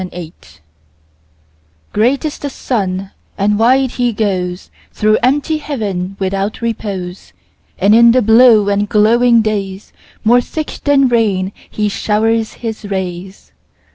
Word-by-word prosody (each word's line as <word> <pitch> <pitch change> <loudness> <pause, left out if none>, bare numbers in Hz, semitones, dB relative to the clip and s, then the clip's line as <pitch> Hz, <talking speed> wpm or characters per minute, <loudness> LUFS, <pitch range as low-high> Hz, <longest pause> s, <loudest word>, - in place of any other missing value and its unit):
4. 185 - -5
Summer 180 - -8
Sun 80 - -17 1.3
GREAT 250 +8 +1
is 300 - -3
the 285 - -4
sun, 195 -8 -3 0.3
and 205 +1 +1
wide 260 +2 +3
he 245 -1 0
goesThrough 200 +1 -2
empty 290 +5 +1
heaven 200 -10 -4
without 195 +2 -2
repose; 200 -6 -5 0.4
And 200 +3 +3
in 235 +1 +7
the 255 +1 +2
blue 225 -1 +5
and 205 0 0
glowing 230 +2 +3
daysMore 215 +3 -2
thick 310 +3 -6
than 280 -2 +4
rain 205 -6 0 0.2
he 210 -1 -2
showers 220 +2 0
his 220 -2 -6
rays. 190 -1 -6
215 Hz, 125 wpm, -15 LUFS, 195-240 Hz, 1.3 s, in